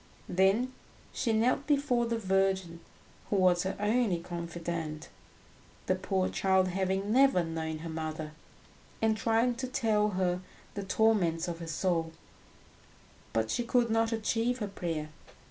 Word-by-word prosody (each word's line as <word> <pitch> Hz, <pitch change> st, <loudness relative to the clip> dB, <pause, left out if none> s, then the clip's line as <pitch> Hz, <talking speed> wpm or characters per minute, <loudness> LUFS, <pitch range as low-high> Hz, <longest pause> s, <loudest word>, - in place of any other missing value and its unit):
Then 195 Hz, +8 st, +2 dB, 0.4 s
she 230 Hz, -, 0 dB
knelt 240 Hz, +5 st, +2 dB
before 275 Hz, -5 st, +2 dB
the 230 Hz, 0 st, -1 dB
Virgin, 190 Hz, -4 st, 0 dB, 0.5 s
who -, -, +1 dB
was 180 Hz, -2 st, +4 dB
her 190 Hz, +1 st, -2 dB
only 210 Hz, -2 st, +2 dB
confidante, 170 Hz, -2 st, -5 dB, 0.8 s
the -, -, +2 dB
poor 185 Hz, 0 st, 0 dB
child 190 Hz, -1 st, +2 dB
having 190 Hz, +2 st, -1 dB
never 265 Hz, -7 st, +5 dB
known 160 Hz, -1 st, -3 dB
her -, -, -4 dB
mother, 155 Hz, -1 st, -4 dB, 0.7 s
and 220 Hz, -1 st, +2 dB
tried 230 Hz, +2 st, +1 dB
to 260 Hz, -, -2 dB
tell 220 Hz, -5 st, +1 dB
her 180 Hz, -1 st, +1 dB, 0.3 s
the 200 Hz, -, -4 dB
torments 190 Hz, -5 st, +2 dB
of 170 Hz, -1 st, -4 dB
her 165 Hz, -, -7 dB
soul; 165 Hz, 0 st, -1 dB, 1.2 s
but 110 Hz, 0 st, 0 dB
she 240 Hz, -, 0 dB
could 235 Hz, -1 st, +2 dB
not 225 Hz, 0 st, +2 dB
achieve 225 Hz, +2 st, 0 dB
her 210 Hz, -4 st, -3 dB
prayer. 165 Hz, -6 st, -4 dB
190 Hz, 140 wpm, -30 LUFS, 170-225 Hz, 1.2 s, never